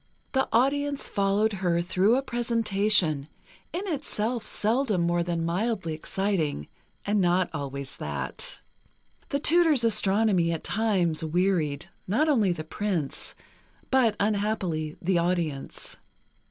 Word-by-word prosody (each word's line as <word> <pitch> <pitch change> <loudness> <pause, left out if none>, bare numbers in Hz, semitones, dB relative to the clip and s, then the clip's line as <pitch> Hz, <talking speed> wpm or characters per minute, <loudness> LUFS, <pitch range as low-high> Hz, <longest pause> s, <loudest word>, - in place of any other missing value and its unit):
The 265 0 +1
audience 280 +4 +1
followed 200 +2 +1
her 170 -2 +2
through 185 +6 +2
a 270 - -1
presentation, 210 - +1 0.4
in 355 - -3
itself 245 - -2
seldom 220 -3 +1
more 170 0 +1
than 170 -1 -1
mildly 185 -1 -1
exciting, 160 - -2 0.4
and 205 0 +2
not 180 0 +2
always 140 -2 -5
that. - - -3 0.7
The 280 - 0
tutor's 315 -3 +4
astronomy 205 -5 +3
at 160 - -5
times 190 -8 0
wearied, 165 -3 0 0.2
not 245 +12 +2
only 225 -11 +3
the 165 -3 -3
Prince, 170 -3 -3 0.6
but, 245 -5 +3
unhappily, 200 -7 -1
the 180 0 +2
audience. 170 -5 -2
195 Hz, 115 wpm, -27 LUFS, 170-230 Hz, 0.7 s, tutor's